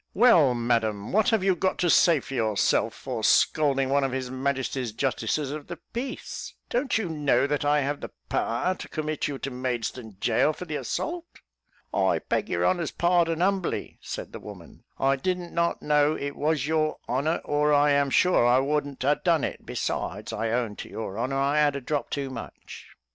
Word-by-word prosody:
"Well, 175 - +6
Madam, 115 -3 0
what 215 +2 +3
have 220 -4 +2
you 190 -1 +3
got 185 +2 0
to 180 - +1
say 165 -6 +5
for - - -9
yourself 110 -5 +1
for - - -5
scalding 135 -3 +3
one 140 +1 +2
of 135 - 0
his 130 -1 -3
Majesty's 130 -2 -2
Justices 135 +3 -1
of 150 -1 -6
the 175 - -6 0.2
Peace? 255 +3 -5 0.2
don't 250 +1 +1
you 220 -4 -2
know 150 -4 +2
that 145 0 -1
I 145 0 +3
have 145 +1 -2
the - - -6 0.2
power 120 +11 0
to - - -9
commit 155 -1 -2
you 145 - -4
to 135 - -5
Maidstone 125 -4 -4
gaol 155 - +2
for 180 - -8
the 155 -3 -4
assault?" 340 0 -4 0.5
"I - - +2
beg - - -2
your - - 0
honour's 175 -3 +1
pardon, 170 -1 +1
humbly," 190 -1 -1
said - - -6
the - - -8
woman; - - -12
"I 135 0 +2
did 180 +7 0
not 170 -1 -2
know 150 0 +3
it 140 -1 -4
was 150 -2 0
your 155 0 0
honour, 145 +6 0
or 150 0 +2
I 145 0 +4
am 140 -1 +3
sure 180 +1 +4
I 120 +1 +5
wouldn't 140 0 -1
a 145 +2 +2
done 170 -4 +3
it; - - -4
besides, 105 +4 -3
I 110 +1 -1
own 115 -3 -1
to - - -8
your 110 -1 -5
honour, 130 +3 -1
I 140 +2 +2
had 145 -2 +3
a - - -2
drop 140 0 -2
too 140 -2 -3
much." - - -9
145 Hz, 195 wpm, -26 LUFS, 130-165 Hz, 0.5 s, Well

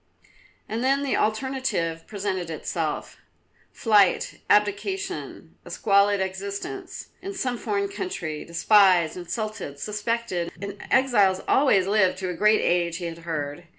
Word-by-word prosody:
And 225 +3 -3
then 275 +2 +2
the 275 - 0
alternative 215 -8 -1
presented 190 -4 -3
itself; 160 - -3 0.5
flight, 205 -5 +2
abdication, 210 - 0
a - - -12
squalid 200 -1 +3
existence 200 - -5
in 390 +1 -6
some 255 -9 -1
foreign 400 - -1
country, 185 - -5
despised, 175 -1 +4
insulted, 185 -4 -5
suspected; 210 -2 -2
and 200 0 -7
exiles 210 -8 +3
always 230 -10 +4
lived 190 -2 +2
to 185 -1 -3
a - - -2
great 210 +5 +3
age 170 -1 +1
he 180 - -5
had 165 0 -6
heard. 160 0 -5
200 Hz, 125 wpm, -25 LUFS, 175-235 Hz, 0.5 s, despised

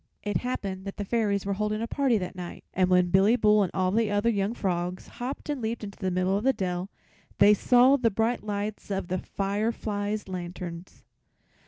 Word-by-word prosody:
It 205 0 0
happened 195 -6 -4
that 195 - -6
the 205 - -3
Fairies 205 -3 0
were 200 - 0
holding 210 +1 -1
a 230 - -1
party 255 -1 +1
that 185 -1 -5
night, 180 -1 -7
and 185 0 +2
when 180 -1 +3
Billy 195 +5 +5
Bull 210 -3 +4
and 190 - +1
all 185 -1 0
the 220 +1 +2
other 205 +3 +2
young 205 +2 -1
frogs 180 -2 -2
hopped 255 +3 -6
and 290 -4 -2
leaped 225 0 -3
into 200 -1 -8
the 190 - -1
middle 185 +1 +1
of 205 - -1
the 265 +1 +4
dell 180 -2 -3 0.5
they 205 +1 +7
saw 250 +6 +5
the 240 -4 +2
bright 225 +3 0
lights 210 0 -4
of 195 -2 -3
the 185 +1 -1
fireflies' 205 +1 -2
lanterns. 175 -1 -7
205 Hz, 200 wpm, -27 LUFS, 185-225 Hz, 0.5 s, they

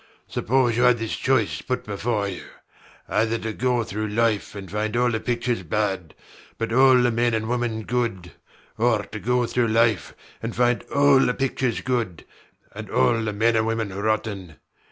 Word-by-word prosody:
Suppose 120 -1 +1
you - - +2
had 125 -1 +5
this 115 -1 -3
choice 130 -6 0
put 125 - -3
before 105 0 -1
you: 95 -3 -6 0.7
either 110 +2 +1
to 110 -1 -4
go 125 0 0
through 110 0 -4
life 110 -1 0
and 100 -2 -8
find 105 +2 -2
all 125 0 +2
the 110 - -1
pictures 120 -2 -1
bad 95 -2 -2 0.4
but 115 0 -3
all 130 +1 +6
the 125 -1 +3
men 120 0 +1
and 110 0 -2
women 120 -2 -1
good, 115 -8 -2 0.5
or 115 -2 +2
to 110 +1 -8
go 125 +3 +1
through 120 0 0
life 115 -2 +1 0.3
and 115 0 -4
find 120 0 +2
all 140 -1 +5
the 125 -2 +2
pictures 130 -2 -1
good 115 -9 -2 0.5
and - - -8
all 90 - +2
the 110 -1 -2
men 115 +3 +2
and 110 0 +2
women 115 -3 -2
rotten. 100 -5 -2
115 Hz, 175 wpm, -23 LUFS, 105-120 Hz, 0.7 s, all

